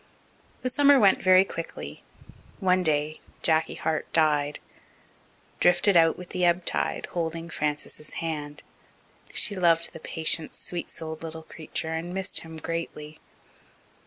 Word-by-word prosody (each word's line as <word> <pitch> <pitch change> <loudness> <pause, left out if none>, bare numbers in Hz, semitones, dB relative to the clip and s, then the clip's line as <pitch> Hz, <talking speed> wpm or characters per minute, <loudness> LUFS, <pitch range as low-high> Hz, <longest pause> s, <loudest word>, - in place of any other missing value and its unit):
The 255 - +1
summer 285 +1 +5
went 200 -4 +4
very 185 0 +6
quickly. 165 -3 -7 0.6
One 185 -2 +3
day 155 -2 0 0.2
Jacky 160 -1 +3
Hart 160 -1 -2
died 150 -2 +2 1.0
drifted 180 +3 +4
out 165 -1 +5
with 180 -1 -10
the 180 - -2
ebb 175 0 +2
tide, - - 0
holding 165 0 -3
Frances's 150 0 -4
hand. 150 -3 -5 0.7
She - - +4
had 185 - -5
loved 165 -1 +3
the - - -9
patient, 160 0 -1
sweet 175 -1 -4
souled 160 -1 -6
little 160 0 -7
creature 160 0 -3
and 170 +3 -4
missed 190 -1 0
him 160 -1 -10
greatly. 155 -2 -5
165 Hz, 135 wpm, -26 LUFS, 155-180 Hz, 1.0 s, very